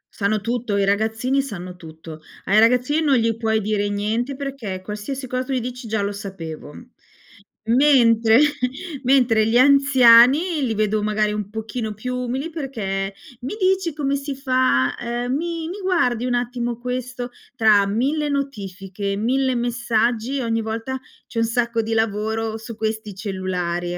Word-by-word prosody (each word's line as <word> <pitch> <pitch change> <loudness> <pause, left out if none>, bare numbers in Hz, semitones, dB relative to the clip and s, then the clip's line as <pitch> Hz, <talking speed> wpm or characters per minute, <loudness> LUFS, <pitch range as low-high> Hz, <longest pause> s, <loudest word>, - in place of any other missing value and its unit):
Sanno 210 0 0
tutto, 230 -2 -2
i 200 - +2
ragazzini 220 +6 +1
sanno 185 -8 -7
tutto. 160 -2 -11 0.2
Ai 210 +3 +4
ragazzini 250 +7 +3
non 290 -4 +3
gli 230 -2 +1
puoi 220 -1 0
dire 205 0 -1
niente, 220 +6 -2
perché, 265 -9 -5
qualsiasi 210 +7 -5
cosa 255 0 -2
tu 270 - -4
gli 255 - +1
dici: 245 0 -6
"Già 215 -2 0
lo 200 - -1
sapevo". 170 -7 -7 0.9
Mentre 230 -3 +5 0.6
mentre 245 -4 +3
gli 235 +2 +3
anziani, 275 +3 +6
li 225 -3 -1
vedo 215 0 +1
magari 210 0 0
un 210 -1 -4
pochino 220 0 -5
più 250 +4 -4
umili, 255 +5 -3
perché: 200 -10 -4 0.3
"Mi 265 +12 -4
dici 375 -3 +1
come 280 -2 0
si 280 0 -4
fa, 255 - +1
ehm, 240 +1 -2
mi 330 0 -3
mi 395 +3 -6
guardi 250 -11 +1
un 245 -1 0
attimo 240 -1 -2
questo". 250 0 -4 0.2
Tra 210 -4 +4
1000 285 +8 0
notifiche, 200 -8 -4
1000 260 +3 +1
messaggi, 240 +1 0
ogni 225 -1 0
volta 225 +4 -4 0.3
c'è 230 - -4
un 230 - +3
sacco 235 0 0
di 225 +1 -3
lavoro 220 0 -1
su 230 0 -8
questi 220 -2 -3
cellulari. 180 -3 -3
230 Hz, 155 wpm, -21 LUFS, 210-260 Hz, 0.9 s, anziani